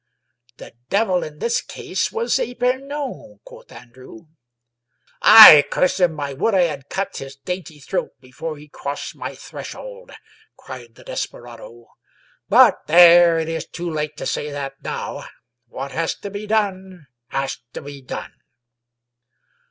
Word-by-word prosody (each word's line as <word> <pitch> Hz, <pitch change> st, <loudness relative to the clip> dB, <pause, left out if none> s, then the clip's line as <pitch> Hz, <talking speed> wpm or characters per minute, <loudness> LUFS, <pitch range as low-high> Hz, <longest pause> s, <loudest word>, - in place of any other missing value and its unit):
" 120 Hz, +1 st, -39 dB
The -, -, -12 dB, 0.2 s
devil 195 Hz, -3 st, +1 dB
in 150 Hz, -1 st, -8 dB
this 235 Hz, +8 st, -1 dB
case -, -, -4 dB
was 465 Hz, +2 st, -1 dB
Epemon," 270 Hz, -, -4 dB
quoth -, -, -15 dB
Andrew. 130 Hz, +7 st, -14 dB, 0.6 s
" 120 Hz, -, -39 dB
Aye, 210 Hz, -9 st, +11 dB
curse 185 Hz, +1 st, 0 dB
him 175 Hz, -4 st, +1 dB
1 145 Hz, -1 st, -3 dB
I 140 Hz, -, -7 dB
would 195 Hz, +10 st, 0 dB
I 185 Hz, -, +4 dB
had 145 Hz, -5 st, -4 dB
cut 195 Hz, 0 st, -4 dB
his 135 Hz, 0 st, -8 dB
dainty 175 Hz, +1 st, -7 dB
throat 145 Hz, 0 st, -5 dB
before 135 Hz, +5 st, -8 dB
he 150 Hz, +1 st, -14 dB
crossed 145 Hz, -1 st, -7 dB
my -, -, -7 dB
threshold," -, -, -10 dB, 0.5 s
cried 120 Hz, -3 st, -11 dB
the -, -, -17 dB
desperado. 120 Hz, 0 st, -8 dB, 0.6 s
But -, -, +5 dB
there, 170 Hz, +1 st, +7 dB
it 160 Hz, -1 st, -2 dB
is 165 Hz, -1 st, -4 dB
too 175 Hz, 0 st, -6 dB
late 150 Hz, -1 st, -4 dB
to -, -, -6 dB
say 150 Hz, -, -3 dB
that 140 Hz, -1 st, -7 dB
now. -, -, -6 dB, 0.4 s
What 135 Hz, +3 st, -7 dB
has 165 Hz, 0 st, -2 dB
to 200 Hz, -, -9 dB
be 205 Hz, +1 st, -7 dB
done, 190 Hz, -5 st, -2 dB, 0.2 s
has 135 Hz, 0 st, -3 dB
to -, -, -7 dB
be 140 Hz, -1 st, -10 dB
done." 130 Hz, -, -8 dB
165 Hz, 150 wpm, -20 LUFS, 140-200 Hz, 0.6 s, Aye